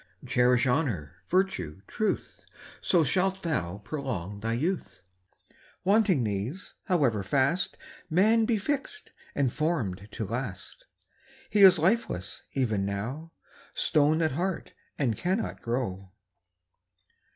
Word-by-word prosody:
Cherish 125 +1 +3
honour, 120 - 0
virtue, 100 - 0
truth, 215 - -2 0.4
So 175 -3 +3
shalt 190 +5 0
thou 100 - -1
prolong 105 - -4
thy 115 +2 -1
youth. 165 +10 -2 0.8
Wanting 195 - +3
these, 110 - -3
however 140 - +2
fast 140 - +1 0.3
Man 215 +7 +4
be 225 -1 +2
fix'd 285 - -3 0.2
and 135 -4 +1
form'd 125 - -1
to 110 - -3
last, 105 -4 -5 0.7
He 210 - +2
is 190 -2 +9
lifeless 165 - 0
even 115 -8 0
now, 115 +12 -4 0.4
Stone 155 +2 +3
at 155 - +2
heart, 175 +6 -3 0.2
and 125 -6 +1
cannot 185 - -2
grow. 100 -6 -3
140 Hz, 110 wpm, -28 LUFS, -, 0.8 s, is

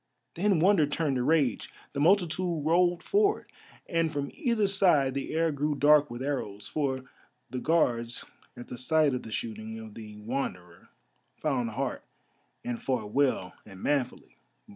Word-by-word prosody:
Then 195 +1 +2
wonder 175 -3 +4
turned 145 -2 0
to 125 - 0
rage; 150 -1 +1 0.2
the 140 - -3
multitude 175 -1 +2
rolled 175 +2 +3
forward, 410 +1 +1 0.4
and 165 -1 +1
from 145 -2 -3
either 235 -9 +1
side 180 -9 +3
the 140 0 -4
air 165 0 +2
grew 150 +1 -1
dark 145 +1 +5
with 120 +2 -6
arrows. 105 -8 -3
For 135 -4 -1 0.5
the 130 - -3
Guards 120 -7 +1 0.3
at 120 - -9
the 125 - -7
sight 155 +2 +3
of 125 - -2
the 110 - -10
shooting 110 0 -5
of 110 -1 -9
the 105 -1 -10
Wanderer 105 -7 -5 0.5
found 130 -6 0
heart 125 +3 -3 0.6
and 120 -1 -3
fought 115 -6 -2
well 130 -10 +1
and 95 -3 -12
manfully. 140 -4 -2
140 Hz, 155 wpm, -29 LUFS, 120-165 Hz, 0.6 s, dark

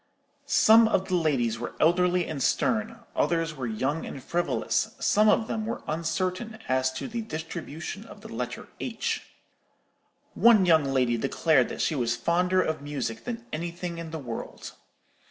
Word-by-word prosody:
Some 225 +1 +6
of 190 -3 0
the - - -2
ladies 130 -9 +1
were 120 - -5
elderly 180 +2 +3
and 145 -4 -5
stern; 225 - 0
others 165 -1 +1
were 130 -4 -4
young 135 +8 -1
and 135 - -7
frivolous; 175 0 -1
some 215 +1 +4
of 225 - +3
them 220 -2 -3
were 230 - -4
uncertain 185 +7 -2
as 130 0 +2
to 130 - -5
the 235 -1 -3
distribution 165 0 -6
of - - -13
the - - -10
letter - - -5
h. - - -2 1.1
One 225 -5 +6
young 160 -4 +5
lady 130 -3 +1
declared 135 +2 +2
that - - -4
she - - +1
was 120 -4 0
fonder 180 +8 +2
of 155 -2 -2
music 135 -6 -4
than 230 -1 -5
anything 170 +1 -4
in 165 -1 -6
the 160 - -5
world. 120 -6 -7
165 Hz, 160 wpm, -27 LUFS, 135-185 Hz, 1.1 s, Some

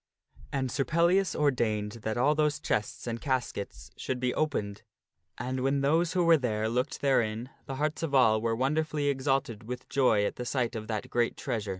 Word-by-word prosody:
And 130 -2 -1
Sir 135 - 0
Pellias 170 +6 +2
ordained 115 -7 0
that 110 +1 -2
all 140 +5 +4
those 150 -1 +1
chests 105 -7 -2
and 115 -1 -4
caskets 120 - -3
should 130 -1 -3
be 125 0 0
opened, 105 -10 -2 0.6
and 130 +1 -3
when 135 +2 +1
those 160 +4 +2
who 180 -1 +2
were 165 -1 +7
there 110 -4 -1
looked 125 +4 -1
therein, 120 -3 +1 0.2
the 135 - -4
hearts 150 +2 -1
of 155 -4 -1
all 110 -4 +5
were 115 0 0
wonderfully 150 +3 0
exalted 135 -5 0
with 125 +1 -6
joy 120 -7 +3
at - - -3
the 125 - -3
sight 120 -1 -1
of 110 -1 -5
that 110 -2 -4
great 120 -1 +1
treasure. 110 -6 -3
130 Hz, 190 wpm, -29 LUFS, 115-145 Hz, 0.6 s, were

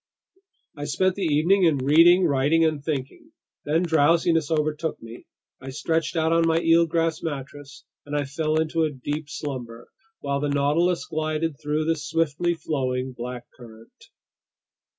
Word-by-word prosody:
I 145 -1 -6
spent 185 +6 +1
the 200 - -7
evening 170 +6 +3
in 160 -4 +3
reading, 165 +7 +5
writing, 150 +2 +2
and 155 -3 -1
thinking. 160 - -5 0.3
Then 160 +4 +1
drowsiness 165 0 +2
overtook 155 0 -1
me, 115 +1 -12 0.3
I 135 - -8
stretched 160 +4 -2
out 160 0 +1
on 165 0 +3
my 165 0 +2
eelgrass 165 -1 +2
mattress, 145 -1 -7 0.2
and 145 0 -6
I 145 - -1
fell 155 +3 -1
into 160 +1 -1
a 160 - +2
deep 145 +3 -5
slumber, 125 -5 -7 0.3
while 140 0 -2
the 145 0 -1
Nautilus 150 +5 +1
glided 155 -1 -2
through 150 +1 -1
the 165 0 +1
swiftly 165 +2 -1
flowing 130 -5 -2
Black 125 0 -6
Current. 115 -2 -16
155 Hz, 150 wpm, -24 LUFS, 140-165 Hz, 0.3 s, reading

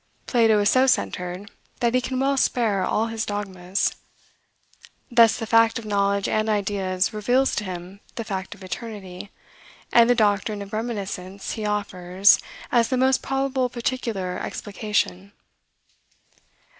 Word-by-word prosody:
Plato 225 -4 +3
is 205 - +2
so 260 +1 +4
centered, 180 -5 -1 0.3
that 235 -1 +1
he 255 - +3
can 255 0 -3
well 275 +1 +2
spare 225 -7 +1
all 220 - +1
his 225 -1 -3
dogmas. 195 -3 -2 1.1
Thus 230 -3 +5
the 225 - -4
fact 230 +1 +4
of 230 - -7
knowledge 200 -1 +1
and 215 0 0
ideas 195 -2 0
reveals 245 +6 +1
to 210 - 0
him 180 +1 -7 0.2
the 230 - -3
fact 190 -3 -5
of - - -15
eternity; 195 -1 -7 0.6
and 235 0 +6
the 245 - +5
doctrine 205 -1 +1
of 200 - -13
reminiscence 200 -4 -4
he 215 -1 -3
offers 195 -2 +3 0.3
as 235 -2 +3
the 260 - 0
most 260 +1 +3
probable 270 -1 -1
particular 230 -7 -3
explication. 200 -1 -3
210 Hz, 140 wpm, -24 LUFS, 195-235 Hz, 1.1 s, and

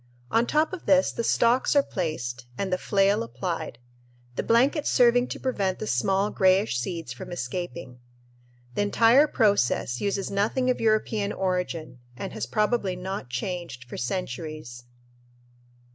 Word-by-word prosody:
On 230 +1 +3
top 310 +3 +1
of 370 - -7
this 280 -1 +4
the 235 - -3
stalks 240 +4 +2
are 285 - +6
placed 130 - -4
and 190 -2 -2
the 185 - 0
flail 200 0 +2
applied, 125 +5 -4 0.6
the - - 0
blanket 265 +6 +2
serving 245 0 +4
to - - -6
prevent 200 -8 -1
the - - -5
small 195 - +1
grayish 190 - +3
seeds 165 -1 -4
from 125 - -9
escaping. 170 -3 -5 0.7
The - - 0
entire 230 +7 +5
process 200 - +1
uses 200 -1 -1
nothing 225 +6 +1
of 250 - -3
European 215 -2 +1
origin 180 -8 -3 0.2
and 195 - -5
has - - -4
probably 210 -3 0
not 185 -6 -5
changed 150 -1 -4
for 125 - -10
centuries. 125 -3 -5
190 Hz, 145 wpm, -26 LUFS, 155-225 Hz, 0.7 s, are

